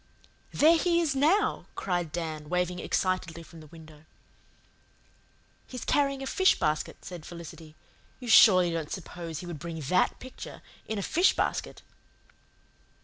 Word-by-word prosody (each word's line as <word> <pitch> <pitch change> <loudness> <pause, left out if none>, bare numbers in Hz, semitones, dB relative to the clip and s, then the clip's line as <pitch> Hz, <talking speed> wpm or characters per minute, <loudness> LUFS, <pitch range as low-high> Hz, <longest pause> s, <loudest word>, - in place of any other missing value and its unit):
"There 325 +2 +5
he 340 0 +2
is 310 -5 0
now!" 320 +10 +2
cried 175 -4 -2
Dan, 155 -2 -5
waving 180 0 -1
excitedly 180 -3 -2
from 165 0 -14
the 155 - -13
window. 155 -1 -15 1.6
"He's 250 -2 -7
carrying 275 -2 +1
a - - -4
fish 375 +7 +3
basket," 155 -1 -2
said 175 -3 -8
Felicity. 165 -2 -11 0.4
"You 250 - -9
surely 185 -6 +7
don't 165 -2 -3
suppose 170 -3 -6
he - - -9
would 170 -4 -7
bring 165 +1 -6
THAT 160 +5 +1
picture 260 0 -10 0.2
in 220 - -3
a 200 - -2
fish 355 - +3
basket!" - - -2
175 Hz, 145 wpm, -28 LUFS, 160-255 Hz, 1.6 s, surely